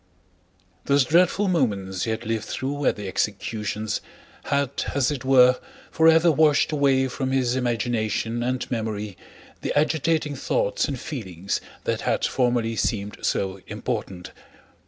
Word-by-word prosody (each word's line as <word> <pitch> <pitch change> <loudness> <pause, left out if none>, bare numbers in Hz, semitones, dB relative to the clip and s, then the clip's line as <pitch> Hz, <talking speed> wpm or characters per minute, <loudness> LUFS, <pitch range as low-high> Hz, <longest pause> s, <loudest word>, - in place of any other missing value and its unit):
Those 140 -1 +3
dreadful 180 +6 +3
moments 100 - 0
he - - -3
had 110 +1 -3
lived 110 -1 -2
through 140 +1 -2
at - - +3
the 105 -2 -6
executions 105 +2 -2 0.4
had 140 -2 0 0.2
as 140 -1 +2
it 140 -3 -4
were 125 -1 +5 0.3
forever 165 +1 +5
washed 150 -1 +3
away 135 -3 +3
from 130 +1 -3
his 130 -2 +1
imagination 120 -2 -1
and 125 +2 -2
memory 105 -4 -3 0.5
the - - -2
agitating 155 0 +1
thoughts - - 0
and 135 -3 -4
feelings 100 - -4 0.2
that - - -1
had - - 0
formerly 120 -3 +1
seemed 105 -2 -2
so 95 0 -1
important. 90 -2 -4
125 Hz, 135 wpm, -24 LUFS, 110-145 Hz, 0.5 s, were